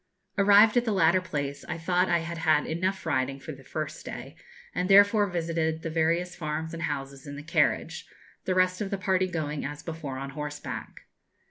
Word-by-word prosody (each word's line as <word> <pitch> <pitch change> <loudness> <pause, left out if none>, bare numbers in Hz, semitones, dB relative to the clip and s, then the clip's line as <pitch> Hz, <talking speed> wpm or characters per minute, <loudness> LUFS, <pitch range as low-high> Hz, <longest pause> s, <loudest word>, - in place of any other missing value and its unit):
Arrived 205 +2 +6
at 240 - +4
the 230 - -1
latter 185 -1 +4
place, 145 -5 -4
I 175 - -2
thought 180 +2 +1
I 170 -1 +3
had 170 0 -5
had 155 -2 +3
enough 185 +3 -2
riding 135 +1 0
for 135 - -7
the 135 -2 -11
first 155 +2 -5
day, - - -8 0.4
and 180 - -1
therefore 205 +1 +6
visited 165 -2 -1
the 165 - -3
various 170 +2 +1
farms 160 0 -4
and 165 - -5
houses 135 -3 -4
in 145 - -6
the 145 - -8
carriage, 170 - 0 0.4
the 185 - 0
rest 185 +1 +2
of 200 - -2
the 200 - -2
party 185 -1 +1
going, 155 -4 -3
as 145 +1 -6
before, 160 -5 -5
on 135 +1 -5
horseback. 150 +1 -6
165 Hz, 195 wpm, -27 LUFS, 150-185 Hz, 0.4 s, Arrived